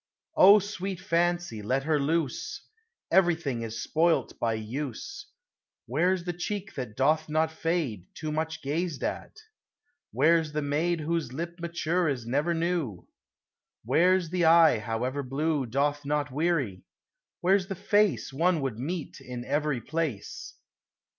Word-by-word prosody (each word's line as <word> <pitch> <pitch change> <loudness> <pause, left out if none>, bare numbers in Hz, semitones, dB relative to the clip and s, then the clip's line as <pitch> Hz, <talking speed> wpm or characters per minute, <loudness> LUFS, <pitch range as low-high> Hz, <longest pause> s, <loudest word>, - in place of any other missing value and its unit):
O 200 +3 +9
sweet 195 -2 -4
Fancy! 175 - 0
let 130 +6 0
her 155 0 +1
loose; 150 -1 -1 0.5
Everything 165 -9 +2
is 115 0 -4
spoilt 165 +1 +1
by 115 -1 +1
use: 115 +4 -5 0.6
Where 175 +10 +2
's 175 - -9
the 175 0 -3
cheek 195 +3 -4
that 125 -6 -6
doth 155 +4 +2
not 160 +1 +1
fade, 160 - -2
Too 155 -1 -4
much 160 +1 -3
gazed 155 +2 -2
at? - - -4 0.7
Where 160 +5 +4
's 150 -1 -9
the 150 0 -1
maid 160 +4 0
Whose 160 -4 -2
lip 170 +4 -5
mature 170 0 0
is 125 -5 -3
ever 145 +7 +1
new? 165 - -2 0.8
Where 180 +9 +4
's 170 -3 -7
the 180 -2 +1
eye, 160 -6 +6
however 120 +6 -2
blue, 140 +1 -1
Doth 145 +4 0
not 145 0 -1
weary? 140 - 0 0.6
Where 190 +3 +4
's 185 - -7
the 195 - -4
face 205 -4 +1
One 170 +4 +2
would 130 -5 -3
meet 160 +4 -4
in 125 -1 -7
every 145 -2 0
place 155 -9 -4
155 Hz, 145 wpm, -28 LUFS, 135-170 Hz, 0.8 s, O